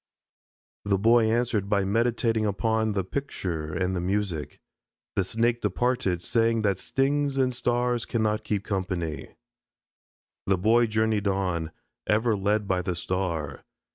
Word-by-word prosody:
The 100 Hz, -1 st, +1 dB
Boy 115 Hz, +2 st, +4 dB
answered 115 Hz, -4 st, 0 dB
by 100 Hz, -1 st, +2 dB
meditating 115 Hz, +1 st, +1 dB
upon 110 Hz, +1 st, 0 dB
the 95 Hz, -1 st, 0 dB
picture 90 Hz, -, -4 dB
and 95 Hz, +3 st, -1 dB
music. 95 Hz, -5 st, -2 dB, 0.6 s
The 95 Hz, -, +2 dB
Snake 115 Hz, +5 st, 0 dB
departed, 105 Hz, -4 st, 0 dB
saying 115 Hz, +1 st, +1 dB
that 100 Hz, -3 st, +1 dB
stings 140 Hz, +1 st, 0 dB
and 130 Hz, -1 st, +2 dB
stars 120 Hz, 0 st, 0 dB
cannot 110 Hz, -2 st, 0 dB
keep 105 Hz, -2 st, -2 dB
company. 90 Hz, -7 st, -3 dB, 1.1 s
The 95 Hz, -1 st, +3 dB
Boy 115 Hz, +5 st, +4 dB
journeyed 110 Hz, -1 st, +1 dB
on, 90 Hz, -4 st, -1 dB, 0.4 s
ever 110 Hz, +1 st, +2 dB
led 105 Hz, +1 st, 0 dB
by 95 Hz, -1 st, +1 dB
the 90 Hz, -1 st, -2 dB
star. 85 Hz, -6 st, -3 dB
105 Hz, 130 wpm, -26 LUFS, 95-115 Hz, 1.1 s, Boy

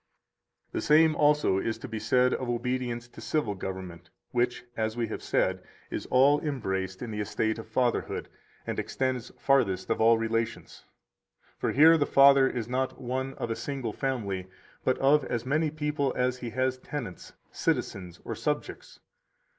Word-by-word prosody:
150 -, -, -4 dB
The -, -, -3 dB, 0.3 s
same 155 Hz, -, -3 dB
also 150 Hz, -10 st, +3 dB
is 115 Hz, +3 st, -2 dB
to -, -, -8 dB
be 110 Hz, -2 st, -4 dB
said 125 Hz, +4 st, +3 dB
of 130 Hz, -, -3 dB
obedience 120 Hz, 0 st, -2 dB
to -, -, -12 dB
civil 150 Hz, -10 st, -1 dB
government, 95 Hz, -2 st, -7 dB, 0.2 s
which 120 Hz, 0 st, 0 dB
(as 110 Hz, 0 st, -2 dB
we 120 Hz, -, +1 dB
have -, -, -5 dB
said) -, -, 0 dB, 0.3 s
is -, -, -4 dB
all 140 Hz, +3 st, +5 dB
embraced 95 Hz, -10 st, -3 dB
in 120 Hz, -, -5 dB
the 105 Hz, -, -4 dB
estate 110 Hz, +1 st, -1 dB
of 110 Hz, -, -8 dB
fatherhood 120 Hz, +2 st, -1 dB, 0.4 s
and -, -, -3 dB
extends 130 Hz, -2 st, -2 dB
farthest 130 Hz, -10 st, +2 dB
of 115 Hz, -, 0 dB
all 115 Hz, +1 st, +6 dB
relations. 115 Hz, 0 st, -3 dB, 0.7 s
For -, -, 0 dB
here 160 Hz, +3 st, +7 dB
the 145 Hz, -, +2 dB
father 140 Hz, -1 st, +6 dB
is 120 Hz, -3 st, -4 dB
not 130 Hz, +2 st, -2 dB
one 130 Hz, +1 st, -3 dB
of 115 Hz, -, -4 dB
a -, -, 0 dB
single 135 Hz, -6 st, -4 dB
family, 100 Hz, -9 st, -2 dB, 0.4 s
but 130 Hz, -, +2 dB
of 145 Hz, +2 st, +4 dB
as 120 Hz, 0 st, -3 dB
many 155 Hz, +4 st, +1 dB
people 150 Hz, -3 st, -1 dB
as 125 Hz, 0 st, 0 dB
he 120 Hz, -, -5 dB
has 130 Hz, +2 st, -1 dB
tenants, 130 Hz, -10 st, -7 dB, 0.2 s
citizens, 90 Hz, -2 st, -2 dB
or -, -, -3 dB
subjects. 150 Hz, -1 st, -4 dB
125 Hz, 170 wpm, -28 LUFS, 110-135 Hz, 0.7 s, here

